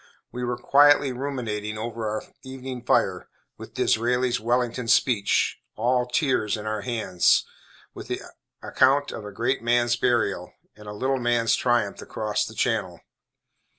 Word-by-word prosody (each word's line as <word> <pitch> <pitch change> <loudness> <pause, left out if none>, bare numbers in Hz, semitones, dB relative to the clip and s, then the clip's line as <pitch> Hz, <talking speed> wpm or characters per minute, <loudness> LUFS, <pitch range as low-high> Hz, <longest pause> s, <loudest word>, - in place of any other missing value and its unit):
We 125 - -5
were 120 0 -2
quietly 145 +2 +5
ruminating 115 -6 -4
over 115 0 -4
our 110 0 -3 0.2
evening 130 -2 -7
fire, - - +1 0.3
with - - -11
Disraeli's 125 +2 +1
Wellington 120 +1 -1
speech, 115 -3 +2 0.2
"all 125 +2 +1
tears," 125 -5 0
in 105 - -8
our 110 -1 -2
hands, 100 -5 +2 0.5
with - - -9
the - - -3 0.4
account 140 +2 +2
of 105 - -7
a 105 - -7
great 120 +6 -1
man's 120 0 +2
burial, 115 -7 0 0.2
and 105 0 -14
a - - -5
little 130 +5 -1
man's 120 -1 +1
triumph 120 -5 0
across 105 -1 -2
the - - -10
channel. - - -1
120 Hz, 145 wpm, -25 LUFS, 110-125 Hz, 0.5 s, quietly